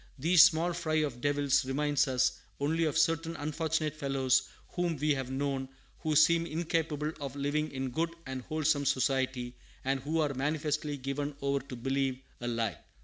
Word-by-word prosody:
These 165 +5 +6
small 175 0 +5
fry 165 -2 -2
of 145 -6 0
devils 145 -1 +2
remind 145 +2 +1
us 130 -1 +1 0.2
only 160 +4 +1
of 155 0 0
certain 165 +1 +2
unfortunate 155 +1 -1
fellows 135 -3 +1 0.2
whom 175 -2 -1
we 150 +2 +2
have 135 -2 -3
known, 135 0 -2 0.3
who 155 -2 -1
seem 165 +2 +5
incapable 160 -2 -1
of 140 -1 -5
living 145 +2 -1
in 130 -1 -3
good 165 +6 0 0.2
and 130 -1 -4
wholesome 155 0 0
society, 130 -2 0 0.3
and 135 0 +1
who 155 +5 -1
are 150 -3 +1
manifestly 150 +1 -1
given 140 +2 -3
over 140 0 0
to 135 -1 -9
believe 135 +1 -1 0.2
a 120 - -4
lie. 115 -3 -1
145 Hz, 165 wpm, -31 LUFS, 135-155 Hz, 0.3 s, These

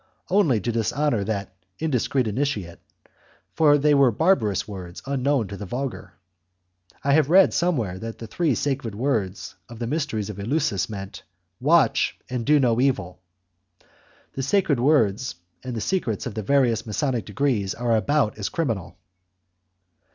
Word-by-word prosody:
Only 175 - +3
to 120 - -1
dishonour 115 +1 0
the 100 -1 -2 0.3
indiscreet 135 -4 0
initiate, 105 -7 -2 0.7
for 145 -2 +5
they 150 +1 +3
were 140 -2 +5
barbarous 115 - +1
words 90 -4 -8
unknown 135 -3 0
to 100 - -6
the 105 - -7
vulgar. 120 -5 -5 0.9
I 140 - +2
have 150 -1 +3
read 190 +3 +6
somewhere 120 - 0
that 115 +1 -6
the 115 - -8
three 150 +4 0
sacred 135 -6 -2
words 105 -6 -2 0.2
of 120 - -10
the 120 - -3
mysteries 115 -7 -2
of 100 - -10
Eleusis 105 - 0
meant: 100 -2 -7 0.4
Watch, 155 +4 +3
and 125 -1 -3
do 150 0 +5
no 120 -3 +2
evil. 95 -10 -1 1.1
The 135 - -3
sacred 155 -1 +1
words 125 -4 +2 0.3
and 125 -2 -5
the 110 - -3
secrets 120 - -1
of 120 - -4
the 110 - -3
various 120 -1 +2
masonic 120 0 -1
degrees 105 -2 -1
are 120 -1 +1
about 110 -1 +1
as 100 - -2
criminal. 115 - -3
120 Hz, 150 wpm, -24 LUFS, 105-145 Hz, 1.1 s, read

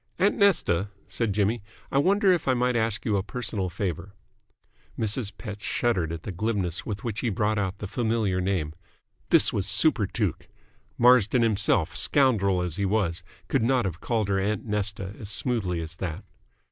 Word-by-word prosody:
"Aunt 200 +2 +3
Nesta," 105 - +2 0.2
said 115 -3 -1
Jimmy, 105 +3 +1 0.3
"I 140 - +3
wonder 195 +5 +4
if 175 -5 0
I 130 - +3
might 125 0 +1
ask 110 -2 -1
you 105 -3 +2
a - - +1
personal 105 -4 -3
favour." 90 +1 -4 0.8
Mrs. 110 0 -1
Pett 105 -3 -7
shuddered 100 -5 0
at 85 -1 -6
the 105 - -5
glibness 95 -2 -2
with 100 -2 -4
which 115 -2 -3
he 120 - 0
brought 105 +1 0
out 95 -1 -2
the 105 - -6
familiar 110 -4 0
name. 90 -5 -1 0.6
This - - +5
was 100 -1 0
superTuke. 105 - +1 0.5
Marsden 125 -1 +5
himself, 95 -6 +1
scoundrel 100 - +2
as 90 -2 -3
he 100 - 0
was, 95 -4 0 0.3
could 135 - +1
not 125 0 +2
have 90 -2 -4
called 110 -4 0
her 95 -1 +2
"Aunt 100 +1 -1
Nesta" 105 -2 -2
as 100 - -6
smoothly 95 -6 0
as 80 0 -5
that. 85 -4 -4
105 Hz, 170 wpm, -26 LUFS, 95-120 Hz, 0.8 s, This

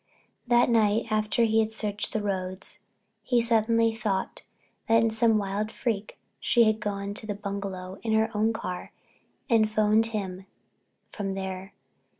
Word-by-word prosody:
That 240 0 +4
night 220 -1 +3
after 215 +2 +2
he 225 -1 +3
had 220 0 +1
searched 210 -2 -2
the 215 - -2
roads, 190 +1 -3 0.4
he 240 +3 +2
suddenly 230 0 +3
thought 210 -4 -2 0.5
that 225 0 +5
in 225 - +2
some 225 0 +3
wild 205 +1 -2
freak 215 -4 -3 0.2
she 235 - +4
had 220 -1 +2
gone 200 -1 -3
to 215 +1 -2
the 205 - -2
bungalow 195 -2 -5
in 225 -1 -1
her 220 +1 +1
own 215 +2 +2
car 180 -5 -5 0.6
and 225 -4 +3
phoned 215 +1 +3
him 195 -4 -5 0.6
from 195 -2 -3
there. 190 0 -5
215 Hz, 150 wpm, -27 LUFS, 200-225 Hz, 0.6 s, that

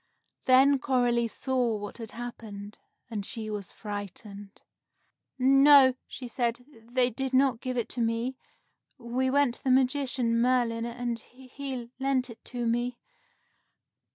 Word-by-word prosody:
Then 265 +2 +6
Coralie 245 -3 +2
saw 245 -1 -1
what 205 +3 -8
had 225 -2 -7
happened, 215 -4 -8 0.3
and 210 -3 -3
she 215 +1 -5
was 205 -3 -5
frightened. 205 -1 -8 0.8
"No," 270 0 +7
she 250 - -7
said, 240 0 -2 0.3
"they 250 0 +3
did 265 +3 -2
not 260 -3 +3
give 255 -1 -3
it 235 - -1
to 245 - -3
me. 230 +3 -1 0.6
We 255 +1 -1
went 280 -2 +3
to - - -12
the 265 - 0
magician, 255 -2 +2
Merlin, 240 -2 +1
and 240 -1 -3
he 255 0 -8
lent 265 -2 0
it 225 - -14
to 245 -2 -4
me." 240 +1 0
245 Hz, 135 wpm, -28 LUFS, 230-260 Hz, 0.8 s, No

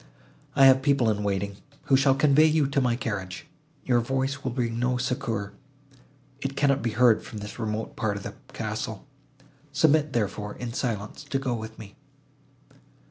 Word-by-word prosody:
I 135 -1 +7
have 130 0 +7
people 135 -5 +3
in 105 -1 -2
waiting, 100 0 -2 0.3
who 135 - +3
shall 135 0 +4
convey 150 +2 +5
you 155 -2 +3
to 140 0 +1
my 125 -2 +2
carriage. 100 -3 -4 0.4
Your 120 -2 +3
voice 135 +3 -1
will 130 - -1
bring 120 -2 -2
no 125 +1 +1
succour; 125 -5 -2 0.9
it 135 0 -3
cannot 140 0 +2
be 115 -2 -1
heard 120 -3 +5
from 110 - -9
this 105 +3 -8
remote 110 -1 -3
part 105 -2 -1
of 100 - -8
the - - -6 0.2
castle; - - -4 0.7
submit, 150 0 +3
therefore, 105 -2 -2
in 120 -2 -6
silence, 110 -5 -3
to 135 - -1
go 135 -2 -1
with 110 -1 -6
me." 100 -2 -12
125 Hz, 170 wpm, -26 LUFS, 110-135 Hz, 0.9 s, I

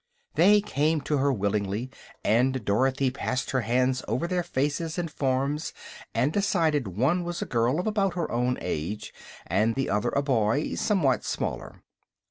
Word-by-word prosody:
They 205 +3 +5
came 155 -5 0
to 145 +1 0
her 140 +1 +2
willingly, 105 +2 -1 0.3
and 125 +1 +2
Dorothy 130 +5 +2
passed 130 0 -2
her 130 - +1
hands 125 +3 +1
over 120 +9 -1
their 180 0 0
faces 155 +2 -2
and 170 -3 -2
forms 140 +3 -1 0.4
and 145 +5 +2
decided 160 - +1
one 155 +10 +2
was 175 0 -3
a - - -5
girl 120 +6 +1
of 180 - -2
about 200 -4 +1
her 170 -3 -2
own 125 +1 0
age 85 +8 -4 0.3
and 115 +2 +1
the 135 -5 -1
other 105 +1 +1
a 140 - 0
boy 125 0 +1
somewhat 170 - +1
smaller. - - -4
135 Hz, 160 wpm, -27 LUFS, 120-160 Hz, 0.4 s, They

